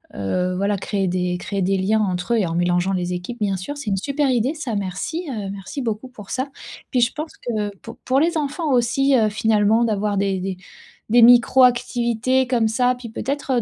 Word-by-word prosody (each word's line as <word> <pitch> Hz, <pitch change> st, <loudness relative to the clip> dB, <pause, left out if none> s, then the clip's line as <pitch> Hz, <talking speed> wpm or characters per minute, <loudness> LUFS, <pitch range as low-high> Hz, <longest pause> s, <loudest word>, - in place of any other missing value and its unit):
heu, 180 Hz, -, -1 dB
voilà, 200 Hz, +2 st, 0 dB
créer 195 Hz, 0 st, -2 dB
des 180 Hz, 0 st, -1 dB
créer 200 Hz, +1 st, -3 dB
des 195 Hz, +1 st, +1 dB
liens 210 Hz, +4 st, +1 dB
entre 180 Hz, +1 st, -1 dB
eux 235 Hz, -, +3 dB
et 195 Hz, -, +1 dB
en 165 Hz, -, -3 dB
mélangeant 175 Hz, +2 st, +1 dB
les 180 Hz, -1 st, -2 dB
équipes, 180 Hz, +7 st, -5 dB
bien 200 Hz, -2 st, 0 dB
sûr. 285 Hz, +11 st, -6 dB
C'est 245 Hz, -7 st, -5 dB
une 195 Hz, -, +1 dB
super 280 Hz, +6 st, 0 dB
idée 250 Hz, +5 st, +1 dB
ça, 275 Hz, -8 st, -4 dB
merci, 200 Hz, -, -3 dB
heu, 210 Hz, -6 st, -4 dB
merci 200 Hz, +8 st, -6 dB
beaucoup 225 Hz, +2 st, -3 dB
pour 210 Hz, -6 st, -13 dB
ça, 260 Hz, +2 st, -2 dB, 0.4 s
puis 250 Hz, -3 st, +2 dB
je 235 Hz, -, +3 dB
pense 305 Hz, +1 st, -5 dB
que 210 Hz, -4 st, -3 dB
pour 230 Hz, -, -11 dB
pour 260 Hz, +1 st, +2 dB
les 330 Hz, +3 st, +1 dB
enfants 295 Hz, +1 st, -2 dB
aussi, 260 Hz, +3 st, +2 dB
heu, 220 Hz, -3 st, +3 dB
finalement 215 Hz, +1 st, +2 dB
d'avoir 210 Hz, -2 st, 0 dB
des 195 Hz, -1 st, 0 dB
des 185 Hz, 0 st, -4 dB, 0.5 s
des 240 Hz, +1 st, +5 dB
micro 245 Hz, +2 st, +6 dB
activités 245 Hz, +1 st, +2 dB
comme 235 Hz, -3 st, +2 dB
ça, 250 Hz, +3 st, +1 dB
puis 245 Hz, -2 st, -9 dB
peut-être, 275 Hz, +4 st, -3 dB
heu, -, -, +2 dB
220 Hz, 215 wpm, -21 LUFS, 195-255 Hz, 0.5 s, micro